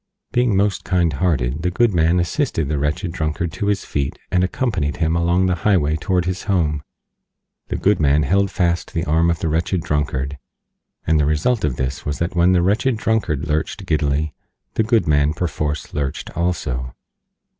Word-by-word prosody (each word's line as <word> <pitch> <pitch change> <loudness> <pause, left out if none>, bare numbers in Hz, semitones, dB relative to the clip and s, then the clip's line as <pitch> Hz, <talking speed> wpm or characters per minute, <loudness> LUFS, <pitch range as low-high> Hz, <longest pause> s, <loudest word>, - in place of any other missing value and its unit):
Being 120 -5 +2
most 100 0 +1
kind 85 -4 +1
hearted, 70 -4 0
the 90 - +1
Good 115 +4 +2
Man 85 +1 +3
assisted 85 - 0
the 75 -2 0
Wretched 75 +5 -1
Drunkard 80 0 -2
to 100 - -3
his 100 -1 0
feet 70 -1 -2
and 90 -1 +3
accompanied 95 - -1
him 80 -1 +1
along 85 +2 +2
the 90 - +2
Highway 80 -8 +2
toward 90 +1 0
his 90 +1 -3
Home. 80 -8 +1 0.9
The - - -3
Good 100 -1 +2
Man 75 0 +3
held 100 +3 +2
fast 85 -1 -1
the 85 +1 0
arm 80 +2 +2
of 85 - +1
the - - 0
Wretched 80 +3 0
Drunkard, 70 -1 -2 0.7
and 80 -1 +3
the 75 - +3
result 90 +10 +1
of 75 -4 0
this 65 +1 -3
was 75 -1 -3
that 85 +3 -2
when 90 +2 +4
the 90 -2 +3
Wretched 110 +6 +1
Drunkard 95 -10 0
lurched 80 +6 -2
giddily 75 -2 0 0.4
the - - +1
Good 110 -4 +2
Man 75 0 +2
perforce 75 -4 -3
lurched 70 -2 -3
too. 65 -8 -2
85 Hz, 180 wpm, -20 LUFS, 75-95 Hz, 0.9 s, when